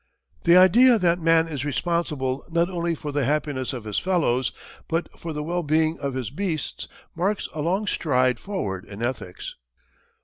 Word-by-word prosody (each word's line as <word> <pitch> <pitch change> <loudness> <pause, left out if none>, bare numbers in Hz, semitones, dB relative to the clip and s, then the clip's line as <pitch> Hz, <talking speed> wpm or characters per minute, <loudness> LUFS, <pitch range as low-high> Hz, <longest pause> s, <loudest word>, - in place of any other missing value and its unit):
The 170 +1 +7
idea 235 +7 +7
that 175 -3 +2
man 165 0 +4
is 145 -5 -4
responsible 145 -3 -1
not 170 +2 +1
only 170 -1 -1
for 150 -1 -5
the 145 0 0
happiness 145 -1 -1
of 125 -5 -6
his 105 -1 -1
fellows, 130 -9 +1 0.4
but 165 +1 -1
for 165 - -6
the 150 -1 -3
well 175 +3 -1
being 160 +1 +1
of 140 -2 -3
his 125 -4 -3
beasts 160 -2 -2 0.3
marks 195 +5 0
a 155 - -3
long 185 +7 0
stride 130 - +1
forward 100 - -4
in 105 +3 -8
ethics. 120 -7 -4
155 Hz, 170 wpm, -24 LUFS, 130-175 Hz, 0.4 s, The